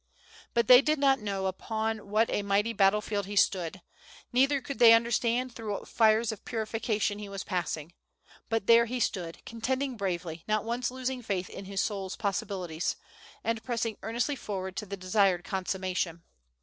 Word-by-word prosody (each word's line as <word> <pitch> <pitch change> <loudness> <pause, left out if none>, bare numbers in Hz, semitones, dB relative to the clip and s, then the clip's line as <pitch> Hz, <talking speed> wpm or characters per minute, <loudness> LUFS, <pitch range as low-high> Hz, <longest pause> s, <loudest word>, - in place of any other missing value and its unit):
But 235 - +3
they 250 0 +10
did 305 +2 +1
not 275 -1 +3
know 200 -3 -3
upon 220 +2 -3
what 215 +2 +3
a - - 0
mighty 200 +3 +1
battle 200 0 +4
field 205 -2 -3
he 205 - -5
stood, 185 -2 +1 0.5
neither 275 +3 +4
could 275 +1 -7
they 230 -1 +9
understand 235 +2 +2
through 220 -3 -4
what - - -6
fires 220 0 +3
of 220 - -9
purification 215 -2 -1
he 205 -1 -7
was 195 0 -5
passing. 175 -3 -3 0.6
But 225 -2 0
there 235 +1 +6
he 250 +2 -3
stood, 175 -7 -2
contending 255 +3 -2
bravely, 175 -4 -3
not 215 -1 +1
once 240 +1 -1
losing 255 0 -3
faith 190 -5 -3
in 195 - -8
his 195 0 -1
soul's 195 -3 -3
possibilities, 190 -5 -2 0.5
and 230 0 -1
pressing 230 -2 -2
earnestly 240 +6 -1
forward 190 -6 -5
to 210 - -4
the 200 +1 -5
desired 185 -1 +2
consummation. 185 -3 -2
210 Hz, 170 wpm, -29 LUFS, 190-235 Hz, 0.6 s, they